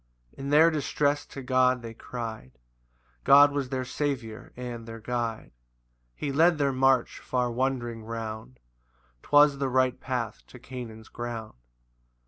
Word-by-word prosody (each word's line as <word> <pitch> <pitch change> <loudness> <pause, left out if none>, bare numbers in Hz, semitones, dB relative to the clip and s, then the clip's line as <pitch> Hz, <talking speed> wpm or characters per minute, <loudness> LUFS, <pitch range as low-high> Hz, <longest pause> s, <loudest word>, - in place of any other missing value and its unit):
] - - -42
5 - - -21
In 135 +1 -4
their 155 +3 +6
distress 145 -1 0
to 135 - -8
God 130 -1 +2
they 115 -1 -7
cry'd, 110 - -7 0.7
God 145 +1 +7
was 140 -2 -2
their 130 -1 -2
Saviour 125 -6 -4
and 120 -2 -6
their 115 0 -8
Guide; 115 0 -3 0.6
He 145 - -3
led 165 +4 +4
their 140 -2 +1
march 130 -1 +2
far 125 -1 -1
wandering 120 -2 -2
round, 110 - -6 0.6
'Twas 145 -1 +5
the 135 -1 0
right 130 0 +2
path 120 -4 -3
to - - -13
Canaan's 120 -3 -9
ground. 120 -2 -6
125 Hz, 145 wpm, -27 LUFS, 115-140 Hz, 0.7 s, God